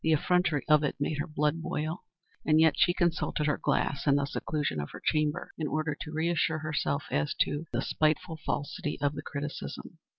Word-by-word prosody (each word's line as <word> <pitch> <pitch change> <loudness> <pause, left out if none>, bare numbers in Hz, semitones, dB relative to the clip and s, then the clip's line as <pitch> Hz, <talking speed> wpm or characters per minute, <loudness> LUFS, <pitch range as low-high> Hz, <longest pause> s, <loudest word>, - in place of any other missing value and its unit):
The 160 - +4
effrontery 165 -2 +2
of 150 0 +5
it 150 - 0
made 145 +1 -1
her 145 - -1
blood 150 +1 0
boil; 160 +2 -3 0.4
and 155 0 +4
yet 160 -2 +6
she 175 - +4
consulted 170 -3 0
her 150 - +1
glass 140 +2 0
in 140 - +6
the 140 0 +2
seclusion 145 - -2
of 75 - -4
her - - -9
chamber 155 -1 +1
in 155 - -1
order 155 0 -1
to 155 - -5
reassure 160 0 +1
herself 155 -2 -1
as 75 +1 0
to 150 +3 0
the - - -1
spiteful 160 +2 0
falsity 145 +1 -3
of 145 0 +1
the - - -5
criticism. 140 - -6
155 Hz, 195 wpm, -29 LUFS, 145-160 Hz, 0.4 s, yet